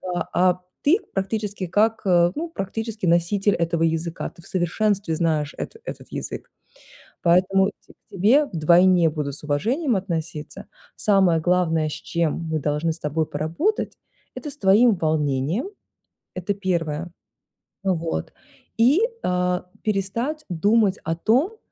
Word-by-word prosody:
а 175 - -3 0.2
а 180 +1 -7 0.2
ты 340 +9 +4 0.2
практически 200 0 -2
как, 215 +5 +1
ну, 180 - +2
практически 215 - -4
носитель 190 +4 +2
этого 170 -1 -1
языка, 165 +1 -1
ты 170 - -18
в - - -15
совершенстве 190 0 0
знаешь 155 -2 0
эт - - -6
этот - - -8
язык. - - -6 0.7
Поэтому 190 +3 +4
к - - -22 0.2
тебе 220 +11 +4
вдвойне 175 +1 +4
будут 150 -3 -3
с - - -11
уважением 235 - 0
относиться. 165 0 -4 0.3
Самое 190 -5 +3
главное, 165 -2 +1
с 150 - -4
чем 170 -3 -1 0.2
мы 155 - 0
должны 150 +3 0
с 165 - -7
тобой 155 +2 -1
поработать- 165 - -1 0.4
это 295 - -6
с 290 - -3
твоим 210 +2 +5
волнением, 155 - 0 0.6
это 185 +2 -2
первое. 170 -4 -2 0.7
Вот, 165 - -2 0.4
и, 260 - +5 0.2
э, 180 0 0 0.2
перестать 230 +9 -2
думать 200 +3 +2
о 165 +1 -1
том, 265 - +1
180 Hz, 130 wpm, -23 LUFS, 165-210 Hz, 0.7 s, твоим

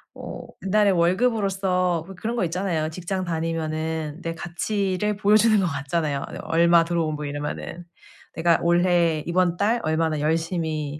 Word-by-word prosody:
어 - - -7 0.3
이달의 205 0 +4
월급으로서 185 -2 +1
뭐 195 - -9
그런 225 +6 -3
거 230 - +1
있잖아요. 170 -2 -1
직장 185 +3 -4
다니면은 160 -1 -3
내 165 0 -3
가치를 195 +4 -2
보여 205 +1 +4
주는 215 -1 +4
것 195 - +1
같잖아요. 140 0 -2
네 - - -6
얼마 170 +1 +4
들어오고 165 -2 -1
뭐 150 0 -5
이러면은 150 +4 -5 0.5
내가 165 0 +3
올해, 170 -2 +2
이번 175 0 +1
달 220 +5 +2
얼마나 160 -1 0
열심히 155 -1 -1
170 Hz, 335 characters per minute, -24 LUFS, 160-190 Hz, 0.5 s, 이달의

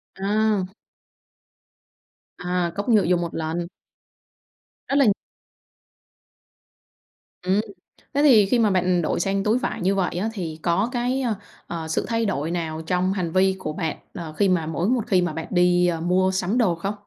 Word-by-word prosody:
À. 205 0 +1 1.7
À, 180 -1 -1
cốc 200 +4 -3
nhựa 215 -4 +5
dùng 175 0 +2
1 170 - -4
lần. 165 +2 -2 1.2
Đó 275 - +1
là 280 -1 +5 2.4
Ừm, 190 +3 +2 0.5
thế 285 - +2
thì 235 -9 +7
khi 235 +5 +2
mà 220 -2 +4
bạn 180 -1 +2
đổi 155 - -1
sang 195 +2 0
túi 215 +4 +2
vải 255 - -3
như 190 +2 +2
vậy 185 -3 -1
á 210 +5 -1
thì 165 -6 -5
có 190 +6 +1
cái, 250 +1 -1
a, 235 -5 0 0.3
ờ, 165 -2 -5
sự 160 - -1
thay 230 -1 0
đổi 160 -5 -1
nào 160 -2 -3
trong 185 +1 +1
hành 180 -4 -2
vi 190 +2 +3
của 155 -4 -4
bạn, 160 -1 -3 0.2
ờ, 165 -3 -7
khi 195 +5 +2
mà 175 -3 +1
mỗi 165 +3 -1
một 245 -3 0
khi 185 -2 +3
mà 175 -3 -1
bạn 160 +1 -5
đi, 180 0 +3
ơ, 165 -2 -1
mua 185 +2 +2
sắm 190 +4 -1
đồ 195 -9 +3
không? 195 +5 -3
185 Hz, 175 wpm, -23 LUFS, 170-210 Hz, 2.4 s, thì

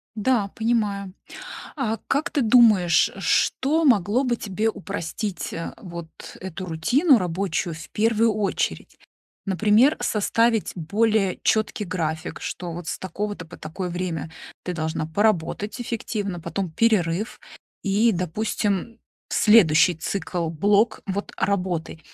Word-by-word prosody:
Да, 215 -1 +1
понимаю. 210 -4 -1 0.6
А 225 -6 -1
как 310 +5 0
ты 285 - +1
думаешь, 215 -8 +5
что 280 - +2
могло 235 - +3
бы 240 -2 +1
тебе 215 +2 -1
упростить, 200 0 -5
э, 165 - -5
вот 170 -5 -8 0.3
эту 185 0 -6
рутину 240 - +3
рабочую 175 -2 -2
в 160 - -10
первую 225 +1 +2
очередь? 210 -2 -2 0.5
Например, 210 - +4
составить 225 +1 +1
более 200 +3 +1
четкий 215 -1 +1
график, 165 -2 -3
что 175 -1 -5
вот 170 0 -7
с - - -3
такого-то 200 -2 -5
по - - -12
такое 170 +4 -5
время 170 -3 -3 0.3
ты 180 - -3
должна 160 -1 -2
поработать 205 +4 0
эффективно, 205 -6 -3
потом 170 +2 -3
перерыв 200 0 +1 0.4
и, 210 +4 +3
допустим, 200 +4 -2 0.3
следующий 180 -6 +5
цикл, 175 0 -3
блок 205 +7 +2
вот 200 +1 -3
работы. 180 -5 -1
200 Hz, 120 wpm, -24 LUFS, 175-220 Hz, 0.6 s, думаешь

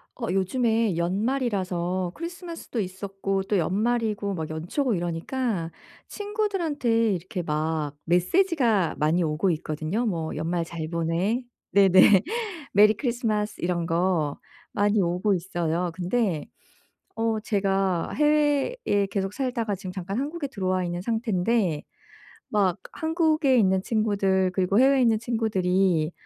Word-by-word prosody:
어 230 - -4
요즘에 220 0 +1
연말이라서 185 -3 -1
크리스마스도 335 - -6
있었고 195 +1 -3
또 200 +1 0
연말이고 210 +3 0
막 160 -4 -4
연초고 180 - -1
이러니까 175 +2 -2 0.4
친구들한테 330 - 0
이렇게 180 0 -4
막 155 -2 -2
메시지가 220 - +2
많이 160 +4 +2
오고 160 +4 0
있거든요. 155 +8 -2
뭐 165 -7 -2
"연말 165 +2 -1
잘 165 -1 -6
보내." 170 +8 0 0.3
네네. 195 0 +6 0.5
"메리 210 +2 +6
크리스마스!" 220 -3 -2
이런 175 -1 0
거 165 -3 0 0.4
많이 205 0 +2
오고 180 +3 +1
있어요. 175 -1 -2
근데 180 -2 -1 0.7
어 225 -1 0
제가 195 -4 0
해외에 295 - +2
계속 195 -1 -2
살다가 235 -5 -2
지금 185 -1 -7
잠깐 190 +2 -4
한국에 290 +3 -3
들어와 185 -7 -1
있는 175 0 -3
상태인데 220 - 0 0.7
막 200 -3 +1
한국에 315 -4 +2
있는 190 -4 +3
친구들 195 -4 +1
그리고 190 +3 +2
해외에 270 +1 +5
있는 225 -2 +3
친구들이 190 -7 +1
195 Hz, 290 characters per minute, -25 LUFS, 175-235 Hz, 0.7 s, 네네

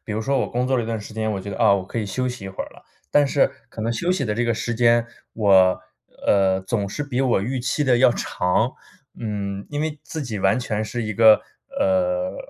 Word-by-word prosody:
比 105 - -5
如 110 - -2
说 135 +4 +1
我 - - -1
工 125 +1 -1
作 130 0 +1
了 120 - 0
一 110 - -5
段 115 -1 -3
时 105 - -10
间， 110 0 -2
我 95 - -3
觉 100 - -7
得， 95 - -6
啊， 100 - +5
我 95 -2 -2
可 115 - -5
以 105 - -2
休 125 +5 -2
息 125 -5 -7
一 - - -5
会 95 - -5
儿 - - -9
了。 - - -18 0.3
但 145 -1 +4
是 140 0 +2 0.2
可 110 - -9
能 115 +2 0
休 175 +9 0
息 145 -7 -1
的 105 - -1
这 120 - 0
个 115 -1 +1
时 120 +1 -3
间， 120 0 +4 0.3
我 95 -4 +4 0.4
呃， 95 -1 +3
总 100 +1 -2
是 145 +9 -4
比 135 -3 -2
我 125 -7 +2
预 125 +5 -2
期 130 +4 -1
的 130 -4 +3
要 125 - +6
长。 90 +8 0 0.5
嗯， 100 -3 -4
因 145 0 -3
为 155 -1 -3
自 160 - -6
己 115 -6 -4
完 95 +5 +2
全 110 -3 -2
是 120 +2 -4
一 110 0 -3
个 110 0 +7 0.4
呃， 275 -1 +1
115 Hz, 275 characters per minute, -22 LUFS, 100-130 Hz, 0.5 s, 个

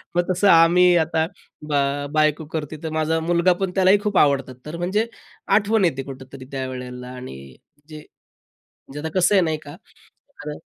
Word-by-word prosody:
मग 175 - +3
तसं 185 +3 +2
आम्ही 175 +1 +6
आता, 160 0 +1 0.4
ब - - -2 0.4
बायको 155 0 +1
करते 155 -1 -4
तर 160 - -3
माझा 160 +1 0
मुलगा 170 +2 +2
पण 190 -2 -1
त्यालाही 190 +1 +4
खूप 205 -3 -1
आवडतात 135 -3 +2
तर 155 +3 -6
म्हणजे 190 +6 -1 0.5
आठवण 210 -1 +2
येते 135 -5 -1
कुठेतरी 130 0 -10
त्यावेळेला 125 -2 -6
आणि 125 - -9 0.5
जे 155 - -9
म्हणजे 145 -1 -17
आता 160 +2 -4
कसं 180 +3 +3
आहे 190 - +5
नाही 160 -2 -1
का 145 - -9 0.7
तर 150 0 -5
160 Hz, 165 wpm, -22 LUFS, 140-180 Hz, 0.7 s, आम्ही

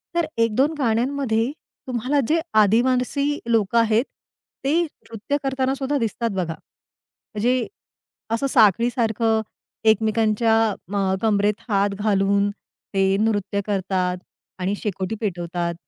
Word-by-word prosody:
तर 340 - +2
1-2 230 +7 +2
गाण्यांमध्ये 240 -1 0 0.4
तुम्हाला 255 +4 0
जे 325 +2 +2 0.2
आदिवासी 255 +6 +1
लोक 225 -1 +1
आहेत 230 +2 +3 0.6
ते 320 +5 +3
नृत्य 280 -3 -5
करताना 265 -1 0
सुद्धा 275 +1 -1
दिसतात 230 -1 -1
बघा. 170 -3 -2 0.8
म्हणजे 245 +3 +1 0.6
असं 230 +4 +1
साखळीसारखं, 225 -1 +3 0.5
एकमेकांच्या 220 +1 +2 0.4
म 195 -2 +1
कंबरेत 210 -1 +1
हात 200 -1 +2
घालून 200 -1 +2
ते 195 -1 -4 0.2
नृत्य 205 -2 0
करतात 190 -2 -1 0.4
आणि 190 +3 -1
शेकोटी 195 0 -2
पेटवतात. 175 -3 -2
220 Hz, 105 wpm, -22 LUFS, 200-250 Hz, 0.8 s, आहेत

